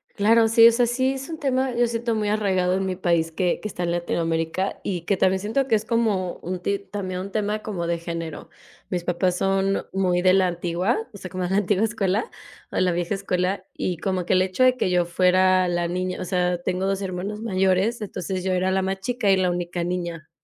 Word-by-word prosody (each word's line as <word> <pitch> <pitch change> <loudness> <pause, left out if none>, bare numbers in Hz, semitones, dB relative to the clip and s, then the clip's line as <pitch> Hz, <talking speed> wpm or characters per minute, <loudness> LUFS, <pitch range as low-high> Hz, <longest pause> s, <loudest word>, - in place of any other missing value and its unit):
Claro, 225 +2 +4
sí, 230 0 +8
o 235 - +7
sea, 240 +1 +2
sí, 260 +3 +1
es 270 +2 -7
un 320 -1 -6
tema, 260 -2 0
yo 240 0 +2
siento 230 0 -1
muy 210 -1 -1
arraigado 190 -4 +1
en 195 0 -1
mi 185 -1 -2
país 170 -3 +1
que 175 +2 0
que - - -3
está 180 -3 -5
en 170 - 0
Latinoamérica, 170 +1 -1
y 180 -4 -2
que 200 - +1
también 190 +1 +2
siento 225 +7 -1
que 230 - +3
es 215 +1 -1
como 215 -6 0
un 180 +1 -4
ti 200 +3 -1
también 190 -2 -5
un 200 - -7
tema 210 0 -1
como 180 -6 -3
de 170 0 0
género. 165 -2 -6 0.4
Mis 175 -2 -3
papás 180 +1 0
son 195 +1 +1
muy 180 -2 +1
de 185 0 +5
la 190 -1 +4
antigua, 175 - -1 0.2
o - - -9
sea, 185 - -8
como 185 -1 -2
de 180 - -3
la 195 - +2
antigua 205 +1 +2
escuela, 210 0 -1 0.4
o - - -4
la 185 -1 +3
vieja 175 +3 -1
escuela, 185 0 -1
y 180 -2 -2
como 185 0 -2
que - - +1
el 185 - +4
hecho 185 +7 +1
de 255 0 +5
que 255 - 0
yo 180 -1 +2
fuera 185 +1 +3
la 175 0 0
niña, 185 +1 -3
o - - -4
sea, 180 -1 0
tengo 180 +2 -1
2, 195 0 -1
hermanos 195 +2 -4
mayores. 195 +2 +1
Entonces, 185 -2 -4
yo 190 - 0
era 185 +1 +1
la 190 0 +1
más 190 0 -2
chica 230 0 0
y 190 - +4
la 185 -1 +2
única 175 0 -2
niña, 175 -3 -4
185 Hz, 235 wpm, -24 LUFS, 180-210 Hz, 0.4 s, sí